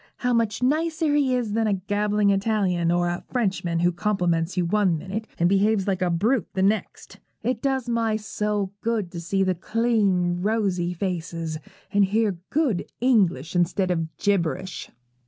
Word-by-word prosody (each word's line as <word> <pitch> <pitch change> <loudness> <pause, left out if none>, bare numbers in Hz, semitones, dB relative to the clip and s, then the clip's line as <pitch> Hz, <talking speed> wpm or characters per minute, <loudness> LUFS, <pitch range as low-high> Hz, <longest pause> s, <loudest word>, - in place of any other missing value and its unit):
How 250 0 0
much 230 0 0
nicer 315 +2 +1
he 275 -3 +2
is 235 -4 -1
than 225 0 +1
a 205 - +2
gabbling 205 +1 +1
Italian, 195 -4 +1
or 175 0 +2
a 175 +1 -3
Frenchman 185 -8 0
who 175 0 +3
compliments 175 -2 0
you 180 - +2
one 185 -2 +2
minute 195 +7 -5
and 170 - +3
behaves 200 +1 +2
like 190 -1 0
a 180 - +2
brute 205 +6 +1
the 190 - +1
next! 210 +3 -1 0.2
It 245 -2 -1
does 265 -3 -1
my 230 -2 +1
soul 210 -2 -2
good 220 -6 -1
to 170 - -6
see 195 +3 0
the 185 -1 +1
clean, 190 -3 +1
rosy 195 -4 0
faces, 165 -3 -3 0.3
and 205 0 +5
hear 205 -2 +1
good 270 - 0
English 190 - +2
instead 180 +2 +1
of 160 -3 -3
gibberish.' 190 -2 -1
200 Hz, 165 wpm, -24 LUFS, 175-225 Hz, 0.3 s, and